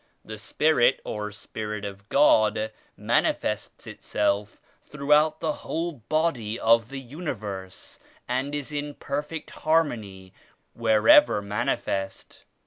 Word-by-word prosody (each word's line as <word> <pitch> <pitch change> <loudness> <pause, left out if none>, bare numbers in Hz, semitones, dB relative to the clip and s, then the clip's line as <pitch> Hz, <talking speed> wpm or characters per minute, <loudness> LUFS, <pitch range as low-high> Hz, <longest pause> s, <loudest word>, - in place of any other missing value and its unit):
The 110 -1 -8
Spirit 130 +3 +3
or 105 -1 -4
Spirit 105 0 -6
of 100 0 -9
God 110 -6 +4 0.3
manifests - - -1
Itself 105 +1 -2 0.2
throughout 150 +2 +2
the 160 -2 0
whole 170 +2 -2
body 125 -4 -1
of 115 0 +4
the 135 - -6
universe 110 - -7 0.3
and 130 +4 -1
is 145 0 -5
in 145 0 -4
perfect 150 +3 -5
harmony 110 - -1 0.4
wherever 110 0 +5
manifest. 100 -1 -3
115 Hz, 105 wpm, -26 LUFS, 105-150 Hz, 0.4 s, wherever